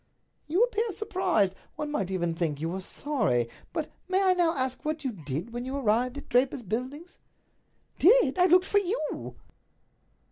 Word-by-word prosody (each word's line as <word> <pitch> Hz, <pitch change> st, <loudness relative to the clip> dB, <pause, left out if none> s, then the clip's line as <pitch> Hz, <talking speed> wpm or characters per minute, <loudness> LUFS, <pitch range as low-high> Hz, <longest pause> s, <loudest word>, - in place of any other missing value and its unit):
"You 350 Hz, +9 st, +3 dB
appear 460 Hz, -2 st, 0 dB
surprised. 350 Hz, -, +1 dB, 0.2 s
One 300 Hz, -1 st, -4 dB
might 195 Hz, -10 st, -1 dB
even 175 Hz, -3 st, -1 dB
think 165 Hz, -3 st, -1 dB
that -, -, -12 dB
you 165 Hz, -, -1 dB
were 190 Hz, +2 st, -4 dB
sorry. 185 Hz, -, 0 dB, 0.2 s
But -, -, -3 dB, 0.2 s
may 375 Hz, +1 st, +2 dB
I 375 Hz, -1 st, +5 dB
now 345 Hz, -2 st, +2 dB
ask 260 Hz, -1 st, -2 dB
what 310 Hz, 0 st, -2 dB
you 260 Hz, -, -1 dB
did 165 Hz, -, -5 dB
when 240 Hz, 0 st, -3 dB
you 260 Hz, +2 st, -4 dB
arrived 250 Hz, +1 st, +1 dB
at 285 Hz, -, -9 dB
Draper's 250 Hz, 0 st, +2 dB
Buildings?" 260 Hz, -, -5 dB, 0.8 s
"Did! 370 Hz, -, +5 dB
I 360 Hz, -, +6 dB
looked 365 Hz, +1 st, +5 dB
for 405 Hz, -, +3 dB
you!" 405 Hz, +4 st, -3 dB
265 Hz, 175 wpm, -28 LUFS, -, 0.8 s, I